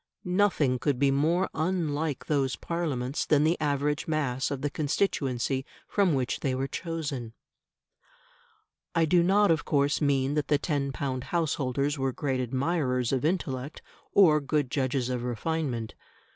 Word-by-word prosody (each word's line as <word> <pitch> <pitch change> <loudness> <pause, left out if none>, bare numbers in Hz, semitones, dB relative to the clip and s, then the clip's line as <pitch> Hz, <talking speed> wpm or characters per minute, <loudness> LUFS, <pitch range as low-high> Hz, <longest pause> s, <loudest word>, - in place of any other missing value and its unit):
Nothing 180 -9 +2
could 140 0 0
be 140 +1 +3
more 160 +7 +2
unlike 155 -4 -1
those 135 -3 0
Parliaments 145 -6 -2
than 150 -1 +3
the 160 +3 +3
average 145 0 0
mass 140 -5 0
of 140 -1 -4
the 145 - +1
constituency 135 -5 0 0.2
from 195 -7 +2
which 130 -2 -1
they 130 -2 -1
were 135 +1 -1
chosen. 140 -9 -4 1.6
I 165 -1 +4
do 175 +2 +4
not 195 +2 +4
of 160 - +1
course 145 0 +1
mean 140 -1 +2
that 150 -1 -1
the 145 - +3
ten 140 -2 -1
pound 130 -3 -3
householders 145 -3 -1
were 135 -1 0
great 135 -1 -1
admirers 130 -1 0
of 130 -2 0
intellect 145 -5 -2 0.3
or 155 -6 +5
good 145 -2 -1
judges 130 -2 0
of 125 -1 -2
refinement. 125 -1 -2
145 Hz, 145 wpm, -28 LUFS, 130-160 Hz, 1.6 s, or